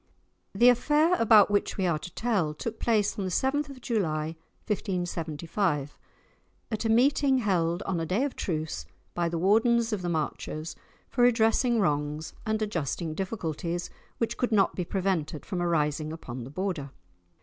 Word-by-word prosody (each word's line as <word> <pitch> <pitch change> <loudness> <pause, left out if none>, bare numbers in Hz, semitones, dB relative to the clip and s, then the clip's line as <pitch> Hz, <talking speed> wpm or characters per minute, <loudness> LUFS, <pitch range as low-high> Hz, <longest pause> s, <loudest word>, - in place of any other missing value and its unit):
The 245 +1 +7
affair 295 +7 +3
about 215 -3 +6
which 205 - 0
we 190 - +1
are 165 -4 +1
to 180 - -8
tell 195 -11 0
took 225 +7 -5
place 215 -3 +1
on - - -1
the - - -1
7th 280 +9 0
of 265 -2 -10
July 160 -9 -1 0.3
1575, 170 -5 -2 0.8
at 220 0 -2
a - - +1
meeting 265 +3 +4
held, 180 -5 +1
on 180 -3 -1
a 165 - -1
day 200 - +1
of 285 - -2
truce, 160 -3 -3 0.3
by 170 -1 0
the 170 - -2
Wardens 225 +5 +3
of 205 - -2
the 175 - -2
Marches, 155 0 -3 0.3
for 245 - -2
redressing 235 0 +4
wrongs 150 -2 -1
and 220 0 0
adjusting 170 -4 -2
difficulties 175 -2 -3 0.3
which 230 - -1
could 245 - 0
not 205 -3 +3
be 180 - -2
prevented 175 -5 -1
from 180 -2 -3
arising 155 -3 0
upon 130 -6 -7
the - - -9
Border. 175 -3 -3
185 Hz, 160 wpm, -28 LUFS, 160-225 Hz, 0.8 s, The